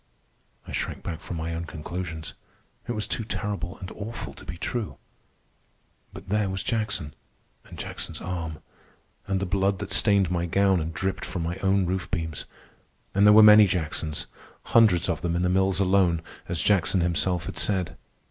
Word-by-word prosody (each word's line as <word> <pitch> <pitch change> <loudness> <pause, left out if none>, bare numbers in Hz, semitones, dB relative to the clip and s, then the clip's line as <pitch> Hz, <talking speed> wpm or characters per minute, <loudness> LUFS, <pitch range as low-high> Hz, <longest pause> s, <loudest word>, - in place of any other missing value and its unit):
I - - -8
shrank - - -3
back 80 -2 -4
from 90 - -6
my 80 +1 -3
own 85 +1 -4
conclusions. 80 0 -6 0.5
It 120 - -1
was 105 -2 -3
too 115 - -1
terrible 100 -4 -4
and 95 - -8
awful 110 +3 -6
to - - -14
be 85 - -7
true. 115 +4 -3 1.1
But - - -11
there 105 -1 +1
was 95 0 -3
Jackson, 100 -9 -2 0.5
and - - -12
Jackson's - - -5
arm, 85 -3 -5 0.6
and 95 -1 0
the 100 - -1
blood 95 +1 +1
that - - -6
stained 100 -3 +4
my 85 -1 0
gown 95 +1 +3
and 80 +1 -3
dripped 95 +4 -2
from 90 -2 -3
my 85 +2 -3
own 95 0 +2
roof 90 +1 -2
beams. 80 -5 -3 0.7
And 100 +1 +5
there 105 - +8
were 110 +1 +9
many 105 -1 +9
Jacksons—hundreds 85 +4 0
of - - -1
them 85 -1 -1
in 90 - 0
the 90 - +2
mills 95 +1 +2
alone, 90 -4 +3 0.3
as 85 -1 -1
Jackson 95 -2 +3
himself 85 0 0
had - - -3
said. 95 -4 0
90 Hz, 175 wpm, -26 LUFS, 85-100 Hz, 1.1 s, were